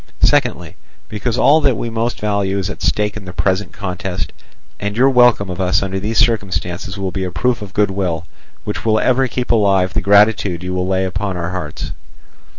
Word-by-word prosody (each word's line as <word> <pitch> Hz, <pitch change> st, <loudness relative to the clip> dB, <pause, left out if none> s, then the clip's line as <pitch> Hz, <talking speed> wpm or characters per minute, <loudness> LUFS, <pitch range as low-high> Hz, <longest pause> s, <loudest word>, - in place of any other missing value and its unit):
Secondly, -, -, +1 dB, 0.3 s
because 115 Hz, +3 st, -2 dB
all 155 Hz, +5 st, +5 dB
that 135 Hz, -6 st, +2 dB
we 120 Hz, -, -3 dB
most 115 Hz, 0 st, -2 dB
value 100 Hz, -2 st, 0 dB
is 95 Hz, -, -2 dB
at -, -, -9 dB
stake 105 Hz, 0 st, 0 dB
in 105 Hz, -2 st, -8 dB
the 90 Hz, -, -7 dB
present 95 Hz, +1 st, 0 dB
contest, 90 Hz, -5 st, -4 dB, 0.5 s
and 105 Hz, +1 st, -3 dB
your 135 Hz, +2 st, +5 dB
welcome 120 Hz, -5 st, +4 dB
of 90 Hz, 0 st, -4 dB
us 95 Hz, +1 st, +2 dB
under 95 Hz, 0 st, -2 dB
these 110 Hz, +3 st, -2 dB
circumstances 95 Hz, -4 st, 0 dB
will 95 Hz, -1 st, -3 dB
be 95 Hz, 0 st, -3 dB
a 90 Hz, -, -2 dB
proof 115 Hz, +7 st, 0 dB
of 100 Hz, -2 st, -7 dB
goodwill 95 Hz, -5 st, 0 dB, 0.4 s
which -, -, -4 dB
will 110 Hz, -1 st, +2 dB
ever 130 Hz, +1 st, +2 dB
keep 125 Hz, 0 st, -2 dB
alive 100 Hz, -4 st, +3 dB
the -, -, 0 dB
gratitude 100 Hz, -3 st, +3 dB
you 90 Hz, 0 st, -3 dB
will 90 Hz, 0 st, -1 dB
lay 95 Hz, 0 st, +1 dB
up 95 Hz, 0 st, -4 dB
in 100 Hz, -3 st, -2 dB
our 85 Hz, +1 st, -3 dB
hearts. 80 Hz, -5 st, -5 dB
100 Hz, 200 wpm, -18 LUFS, 95-110 Hz, 0.5 s, all